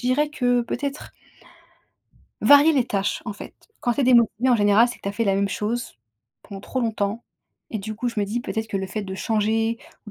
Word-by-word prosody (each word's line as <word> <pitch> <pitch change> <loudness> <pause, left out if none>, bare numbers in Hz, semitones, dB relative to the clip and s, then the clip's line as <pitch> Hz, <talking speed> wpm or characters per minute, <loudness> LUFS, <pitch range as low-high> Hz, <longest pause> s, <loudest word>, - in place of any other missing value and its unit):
dirais 255 +4 +1
que 245 -4 +1
peut-être 275 +4 -5 1.3
varier 290 +3 +7
les 260 -5 +2
tâches, 200 -1 -1
en 210 - -4
fait. 205 - -11 0.3
Quand 240 -1 0
tu - - -1
es - - +2
démotivée, 240 -1 +4
en 245 - +5
général, 205 +3 +4
c'est 240 - -7
que - - -25
tu 200 - -3
as - - -3
fait 230 +2 -1
la 195 -1 +2
même 200 0 +1
chose 230 +4 -3 0.5
pendant 195 -2 -9
trop 260 - -4
longtemps. 220 -1 -2 0.5
Et 220 - -3
du 215 +2 -6
coup, 245 +3 -2
je 225 -3 -3
me - - +1
dis 225 +4 -2
peut-être 220 -2 -4
que 205 - -2
le 190 0 -3
fait 210 +2 -4
de 190 -1 -6
changer, 220 +4 0 0.3
ou 210 - -9
225 Hz, 225 wpm, -23 LUFS, 205-245 Hz, 1.3 s, varier